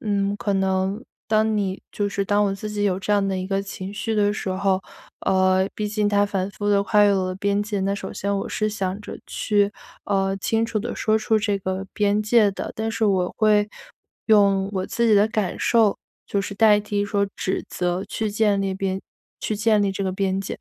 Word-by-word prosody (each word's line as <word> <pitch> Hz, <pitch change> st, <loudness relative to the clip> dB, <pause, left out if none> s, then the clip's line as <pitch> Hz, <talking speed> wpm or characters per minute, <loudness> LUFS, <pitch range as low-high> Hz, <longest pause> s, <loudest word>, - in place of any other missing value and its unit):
嗯， 200 Hz, -1 st, 0 dB
可 205 Hz, -, -1 dB
能 190 Hz, +2 st, 0 dB, 0.3 s
当 215 Hz, 0 st, +2 dB
你 195 Hz, -2 st, -2 dB
就 205 Hz, -1 st, -1 dB
是 200 Hz, 0 st, -2 dB
当 205 Hz, +1 st, +2 dB
我 195 Hz, -, 0 dB
自 215 Hz, +2 st, -6 dB
己 210 Hz, -1 st, -3 dB
有 190 Hz, -2 st, +1 dB
这 205 Hz, +2 st, -1 dB
样 200 Hz, -1 st, +2 dB
的 190 Hz, -1 st, -1 dB
一 185 Hz, 0 st, -3 dB
个 195 Hz, 0 st, -1 dB
情 195 Hz, 0 st, -7 dB
绪 225 Hz, +1 st, -2 dB
的 205 Hz, -1 st, +2 dB
时 205 Hz, -, -4 dB
候， 190 Hz, 0 st, 0 dB, 0.4 s
呃， 190 Hz, 0 st, +2 dB
毕 210 Hz, -, -2 dB
竟 210 Hz, 0 st, 0 dB
它 205 Hz, 0 st, +3 dB
反 195 Hz, -1 st, -2 dB
复 205 Hz, +1 st, -4 dB
地 200 Hz, -1 st, +3 dB
跨 210 Hz, +1 st, +3 dB
越 205 Hz, -, +5 dB
了 195 Hz, -1 st, +2 dB
我 185 Hz, -, -2 dB
的 185 Hz, -, -3 dB
边 200 Hz, +1 st, 0 dB
界， 205 Hz, -1 st, -3 dB
那 195 Hz, +1 st, 0 dB
首 190 Hz, -1 st, -6 dB
先 200 Hz, 0 st, -2 dB
我 -, -, -4 dB
是 215 Hz, 0 st, -1 dB
想 195 Hz, -2 st, -3 dB
着 210 Hz, -, -8 dB
去， 205 Hz, -1 st, +1 dB, 0.3 s
呃， 195 Hz, -1 st, 0 dB
清 225 Hz, +3 st, 0 dB
楚 225 Hz, -2 st, -2 dB
地 240 Hz, -, -4 dB
说 220 Hz, 0 st, +2 dB
出 220 Hz, 0 st, +1 dB
这 205 Hz, -2 st, 0 dB
个 190 Hz, 0 st, -3 dB
边 205 Hz, 0 st, +1 dB
界 215 Hz, -1 st, +4 dB
的。 195 Hz, -, -6 dB
但 220 Hz, 0 st, -2 dB
是 225 Hz, 0 st, -1 dB
我 185 Hz, -3 st, +1 dB
会 210 Hz, -1 st, +3 dB, 0.6 s
用 200 Hz, -3 st, +4 dB
我 185 Hz, -1 st, -1 dB
自 235 Hz, 0 st, 0 dB
己 220 Hz, -, +5 dB
的 205 Hz, +1 st, +5 dB
感 215 Hz, -3 st, -1 dB
受， 225 Hz, -4 st, +3 dB, 0.3 s
就 200 Hz, -, 0 dB
是 200 Hz, -, -5 dB
代 210 Hz, -1 st, +5 dB
替 205 Hz, -1 st, -1 dB
说 200 Hz, 0 st, +1 dB
指 190 Hz, -, -2 dB
责 180 Hz, +2 st, -2 dB
去 215 Hz, +1 st, -3 dB
建 205 Hz, -1 st, +2 dB
立 195 Hz, -1 st, -1 dB
边 190 Hz, 0 st, -2 dB, 0.4 s
去 215 Hz, -, -2 dB
建 215 Hz, 0 st, +2 dB
立 200 Hz, -1 st, +1 dB
这 195 Hz, -, -3 dB
个 190 Hz, -, 0 dB
边 190 Hz, 0 st, -1 dB
界。 195 Hz, -, -5 dB
200 Hz, 245 characters per minute, -23 LUFS, 195-210 Hz, 0.6 s, 越